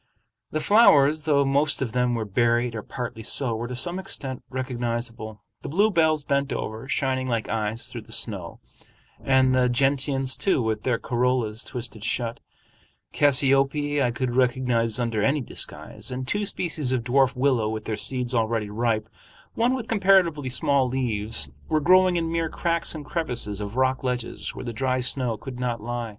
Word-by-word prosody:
The 155 - -2
flowers, 155 -7 +5
though 140 -3 +3
most 140 +2 +2
of 130 -4 -2
them 125 0 +1
were 110 -2 -2
buried 120 +3 +1
or 110 - -4
partly 120 -1 -6
so, 120 +1 0
were 115 +2 -4
to 125 - -5
some 175 +9 0
extent 135 -8 -5
recognizable, 120 -4 -4 0.2
the - - -6
bluebells 160 -4 +2
bent 140 0 0
over, 110 +5 -5
shining 130 -3 0
like 115 -3 -1
eyes 110 +1 -2
through - - -7
the - - -16
snow, - - -2 0.6
and 130 -1 +3
the 125 -1 +3
gentians, 135 0 +1
too, 190 +5 +1
with 110 -1 -1
their 125 -3 0
corollas 120 -3 0
twisted 115 -4 -5
shut; 120 0 -2 0.7
cassiope 140 +1 +2
I 125 - +2
could 120 0 -2
recognize 125 -3 +1
under 115 -3 -1
any 140 +7 +2
disguise; - - -4
and 130 0 -4
two 205 +4 -1
species 155 -8 -2
of 125 -3 0
dwarf 130 +2 +2
willow 125 -4 +1
with 110 -1 -5
their 110 - -2
seeds 125 +3 0
already 110 -2 0
ripe, 110 -1 0 0.5
one 240 +3 +2
with 240 -3 -5
comparatively 185 - +3
small 135 +1 +2
leaves, 110 - 0 0.2
were 155 - +2
growing 185 +3 +5
in 165 -1 -1
mere 165 -1 -1
cracks 170 0 -2
and 150 -2 -7
crevices 120 - -3
of 105 +4 -6
rock 130 0 +1
ledges 125 -2 -3
where - - -7
the 120 - -4
dry 130 +2 0
snow 125 -2 0
could 125 +3 -8
not 120 -2 -2
lie. 120 +1 -4
130 Hz, 170 wpm, -25 LUFS, 115-140 Hz, 0.7 s, flowers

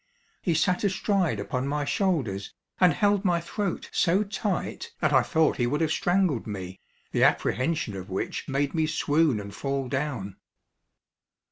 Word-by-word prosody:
He 170 -4 +1
sat 180 +4 +1
astride 190 - +1
upon 125 +6 -2
my 145 +1 -1
shoulders, 135 - -1 0.2
and 180 -2 +6
held 205 +5 +2
my 175 -3 +2
throat 185 +2 -3
so 185 +5 +3
tight 205 -2 -3
that - - +1
I - - +6
thought 160 -1 +2
he 120 - +1
would 145 +4 0
have 160 -2 +1
strangled 175 - +1
me, 95 -3 -6 0.3
the - - +2
apprehension 130 - +1
of 95 0 -7
which 95 - -3
made 140 +1 0
me 160 -1 +1
swoon 155 -4 +2
and 100 -1 -8
fall 135 -1 -2
down. 125 -8 -3
150 Hz, 155 wpm, -27 LUFS, 120-180 Hz, 0.3 s, and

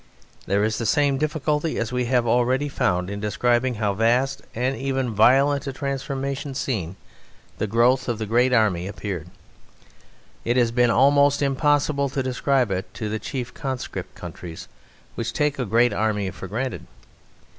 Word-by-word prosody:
There 100 +2 +2
is 110 0 0
the 115 - -1
same 140 0 +2
difficulty 150 +1 -1
as 115 0 -2
we 125 0 0
have 120 -1 +2
already 125 +4 +2
found 90 -10 0
in 100 +1 -5
describing 120 +4 +1
how 105 -2 0
vast 120 +6 +1
and 125 +3 0
even 135 -3 -2
violent 135 +6 +4
a 135 - -3
transformation 140 0 -3
scene 95 -10 -2 0.6
the 110 - 0
growth 120 +4 +2
of 120 - -1
the 110 - -3
great 120 +4 +2
army 105 -7 +2
appeared; 95 -4 -5 1.2
it 120 +2 0
has 120 -2 +3
been 120 0 +3
almost 140 +4 +4
impossible 140 0 +1
to 135 0 -2
describe 130 -2 +1
it 95 +1 -3
to 110 -2 -4
the 110 +1 -2
chief 125 -1 -5
conscript 130 -3 -5
countries, 85 -2 -9 0.5
which 115 0 -4
take 150 -2 0
a 125 - 0
great 115 +4 +3
army 105 -2 0
for 95 - -8
granted. 125 +6 -4
125 Hz, 160 wpm, -23 LUFS, 110-135 Hz, 1.2 s, violent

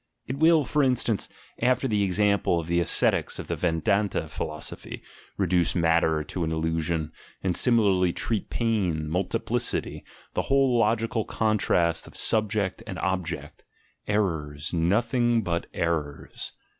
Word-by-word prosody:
It 130 +2 -5
will, 160 -2 +5
for 150 - +1
instance, 125 -5 +1 0.3
after 130 +2 +2
the 105 -4 +1
example 100 -2 +2
of 85 - -5
the 85 +1 +1
ascetics 85 - +2
of - - -6
the - - -3
Vedanta 100 +4 0
Philosophy, 75 0 -6 0.3
reduce 90 -3 +1
matter 80 -2 +2
to 90 +3 -4
an 80 - -1
illusion, 80 0 -1 0.3
and 90 -2 0
similarly 100 -7 +3
treat 110 +3 -2
pain, 95 -10 0
multiplicity, 90 +4 -2 0.3
the - - 0
whole 135 -2 +3
logical 115 0 +1
contrast 95 -7 +1
of - - -9
"Subject" 105 -3 +1
and - - -5
"Object" 95 -2 -3 0.3
— - - -43
errors, 80 -8 -1
nothing 115 +7 +2
but 85 -2 -2
errors! 80 -4 -3
95 Hz, 130 wpm, -26 LUFS, 85-115 Hz, 0.3 s, will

